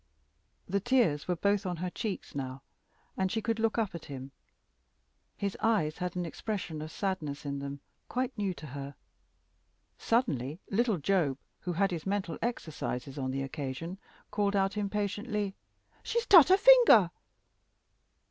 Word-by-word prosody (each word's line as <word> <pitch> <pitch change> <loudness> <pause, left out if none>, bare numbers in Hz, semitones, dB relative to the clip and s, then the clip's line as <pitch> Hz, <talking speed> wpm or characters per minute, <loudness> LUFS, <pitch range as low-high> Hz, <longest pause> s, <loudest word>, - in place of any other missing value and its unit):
The 200 +2 +1
tears 210 - +2
were 180 - +1
both 200 +3 +1
on 180 -3 -3
her 180 +2 -3
cheeks 215 -2 -4
now, 135 -1 -5 0.5
and 190 -1 0
she 225 - 0
could 225 0 -1
look 225 0 +1
up 220 -4 0
at 170 - -7
him. 135 -1 -7 1.1
His 200 -1 -2
eyes 200 -9 +1
had 180 -1 -3
an 180 -1 -1
expression 170 -3 -4
of 155 - -5
sadness 155 -7 -3
in 140 -1 -3
them, 140 0 -6 0.3
quite 255 +1 -1
new 200 -4 -1
to 155 - -9
her. 140 0 -7 1.0
Suddenly 160 - 0
little 225 0 +2
Job, 160 -4 +1 0.2
who 180 - -3
had 195 +3 +2
his 170 0 -4
mental 190 -5 -2
exercises 150 - -3
on 130 -1 -1
the 135 +1 -2
occasion, 145 +6 -5 0.3
called 205 -1 +1
out, 195 +1 +2
impatiently 210 0 -2 0.5
"She's 470 0 -1
tut 350 -6 +9
her 380 - +7
finger!" 445 - +7
190 Hz, 150 wpm, -31 LUFS, 150-210 Hz, 1.1 s, tut